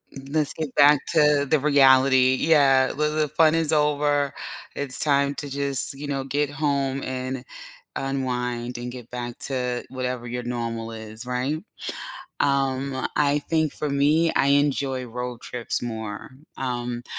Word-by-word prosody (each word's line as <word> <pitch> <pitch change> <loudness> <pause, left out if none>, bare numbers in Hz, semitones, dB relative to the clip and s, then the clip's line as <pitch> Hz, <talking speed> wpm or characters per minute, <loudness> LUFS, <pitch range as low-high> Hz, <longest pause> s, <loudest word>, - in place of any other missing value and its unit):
M 135 0 -9
let's 155 -2 0
get 155 -4 -5
back 145 0 +7
to 150 -2 +4
the 155 +1 +2
reality, 130 -2 +5
yeah, 135 -4 +4
well, 150 +1 0
the 155 -1 +1
fun 155 +2 +3
is 160 -1 +1
over 145 -1 +2 0.4
it's 140 -3 -3
time 140 -1 +2
to 140 +2 -5
just, 140 -1 -1
you 145 +1 -7
know, 135 -1 -2
get 145 +1 -1
home 140 -2 -1
and 130 0 -4 0.5
unwind, 125 -3 -2
and 120 0 -5
get 120 -2 -10
back 120 -1 -5
to 125 -2 -2
whatever 125 -2 -4
your 125 0 -4
normal 115 -1 -4
is, 110 +1 -8
right? 130 +5 -2 0.8
Um, 135 -1 0
I 145 0 +3
think 160 0 0
for 150 - -3
me, 150 +4 +3
I 140 - +2
enjoy 140 -2 +1
road 125 0 -6
trips 120 -2 -3
more, 110 -3 -5 0.3
um, 120 -2 -3
135 Hz, 150 wpm, -24 LUFS, 125-145 Hz, 0.8 s, back